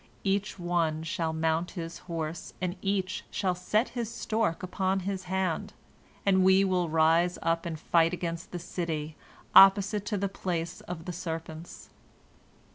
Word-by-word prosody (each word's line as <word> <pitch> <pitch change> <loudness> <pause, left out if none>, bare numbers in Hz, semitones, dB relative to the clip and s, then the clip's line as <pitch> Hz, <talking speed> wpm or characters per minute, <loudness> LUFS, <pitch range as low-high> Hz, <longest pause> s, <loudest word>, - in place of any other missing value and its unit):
Each 200 +1 0
one 170 -3 0
shall 165 0 -1
mount 160 +2 0
his 165 0 -5
horse, 165 -1 -4
and 180 -1 -2
each 195 -2 -1
shall 190 -3 0
set 210 +6 0
his 235 -3 -3
stork 215 -7 -1
upon 190 +1 0
his 190 0 -3
hand, 185 -2 -1 0.5
and 190 -2 +4
we 190 +1 +6
will 180 -3 +1
rise 165 +3 +3
up 165 +1 0
and 160 -2 -4
fight 165 +1 +3
against 170 -1 -4
the 180 - -4
city 160 -3 -4 0.4
opposite 200 +1 +7
to 210 - 0
the 200 +1 0
place 180 -2 -3
of 170 -2 -6
the 180 - -4
serpents." 165 -1 -7
175 Hz, 150 wpm, -29 LUFS, 165-190 Hz, 0.5 s, opposite